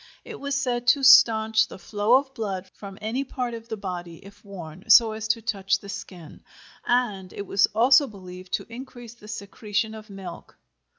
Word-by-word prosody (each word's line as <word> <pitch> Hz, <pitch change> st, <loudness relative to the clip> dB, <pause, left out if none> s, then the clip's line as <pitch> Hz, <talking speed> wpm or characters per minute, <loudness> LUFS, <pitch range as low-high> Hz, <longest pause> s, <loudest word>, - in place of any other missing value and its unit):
It -, -, -9 dB
was 280 Hz, 0 st, -3 dB
said 245 Hz, -3 st, -1 dB
to 275 Hz, +2 st, +4 dB
stanch 225 Hz, -3 st, +6 dB
the -, -, -11 dB
flow 205 Hz, +5 st, +1 dB
of 270 Hz, 0 st, +1 dB
blood 195 Hz, -5 st, -4 dB
from 195 Hz, -2 st, -10 dB
any 225 Hz, +5 st, -2 dB
part 250 Hz, -3 st, -4 dB
of 230 Hz, 0 st, -9 dB
the 220 Hz, -, -4 dB
body 180 Hz, -4 st, -6 dB
if 200 Hz, +1 st, -15 dB
worn 185 Hz, 0 st, -10 dB
so 225 Hz, +1 st, +7 dB
as 220 Hz, 0 st, -5 dB
to 225 Hz, 0 st, 0 dB
touch 195 Hz, -3 st, 0 dB
the 200 Hz, 0 st, -13 dB
skin, 175 Hz, -4 st, -9 dB, 0.5 s
and 210 Hz, -7 st, 0 dB
it 200 Hz, -, -7 dB
was 195 Hz, 0 st, +3 dB
also 260 Hz, +5 st, +5 dB
believed 185 Hz, -4 st, -11 dB
to -, -, -1 dB
increase 245 Hz, -2 st, -10 dB
the 225 Hz, -3 st, -16 dB
secretion 215 Hz, +1 st, -3 dB
of 215 Hz, 0 st, -11 dB
milk. 190 Hz, -3 st, -10 dB
215 Hz, 185 wpm, -25 LUFS, 195-240 Hz, 0.5 s, so